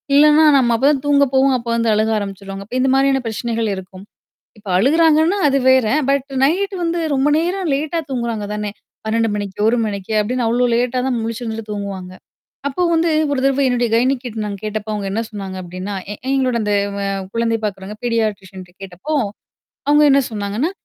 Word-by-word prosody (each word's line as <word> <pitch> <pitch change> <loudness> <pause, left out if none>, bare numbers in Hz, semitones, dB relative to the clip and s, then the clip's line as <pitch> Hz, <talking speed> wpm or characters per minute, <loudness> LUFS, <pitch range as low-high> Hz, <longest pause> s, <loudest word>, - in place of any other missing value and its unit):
இல்லன்னா, 300 +2 +6
நம்ம 240 -3 +3
அப்ப 265 - 0
தான் 275 -3 -1
தூங்கப் 280 -2 +3
போவோம். 265 0 +4
அப்போ 235 - -7
வந்து 230 -1 +1
அழுக 215 +1 +1
ஆரம்பிச்சிருவாங்க. 195 0 -7
அப்ப 250 - -7
இந்த 265 - +2
மாதிரியான 270 -1 +3
பிரச்சனைகள் 225 0 -2
இருக்கும். 190 +1 -10 0.5
இப்ப 205 -2 -13
அழுகுறாங்கன்னா, 320 - +3
அது 275 - +2
வேற. 260 -4 +4 0.2
பட் 275 -1 +1 0.2
நைட்டு 385 +7 +1
வந்து 335 +1 -1 0.2
ரொம்ப 270 +2 +2
நேரம் 355 0 -1
லேட்டா 310 +4 -1
தூங்குறாங்க 235 -4 -2
தானே! 210 -1 -3 0.4
12:00 225 +1 +1
மணிக்கு, 200 -1 -5
1:00 245 - +1
மணிக்கு, 200 +1 -4
அப்டின்னு 240 +2 -1
அவ்ளோ 245 +2 +2
லேட்டா 250 +1 0
தான் 245 -2 0
முழிச்சிருந்துட்டு 225 -1 -5
தூங்குவாங்க. 195 -3 -5 0.6
அப்போ 320 +6 -2
வந்து 330 0 +2 0.2
ஒரு 265 - 0
தரவ 275 0 +2
என்னுடைய 245 -1 +1
கயனிக்கிட்ட 245 -1 0
நான் 205 -1 -4
கேட்டப்ப, 215 0 -4
அவுங்க 205 -2 -3
என்ன 225 - -1
சொன்னாங்க 195 -3 -6
அப்டின்னா, 185 +3 -6 0.2
எ - - -4 0.2
எங்களோட 260 -3 +1
அந்த 210 - -1 0.2
வ - - -3 0.3
குழந்தைப் 230 -1 0
பாக்குறவங்க 200 +1 -5
பீடியாட்ரிசன்ட்ட 200 -6 -3
கேட்டப்போ, 190 - -7 0.8
அவுங்க 295 +1 +5
என்னா 275 0 +5
சொன்னாங்கன்னா, 210 - -2
230 Hz, 175 wpm, -19 LUFS, 205-275 Hz, 0.8 s, இல்லன்னா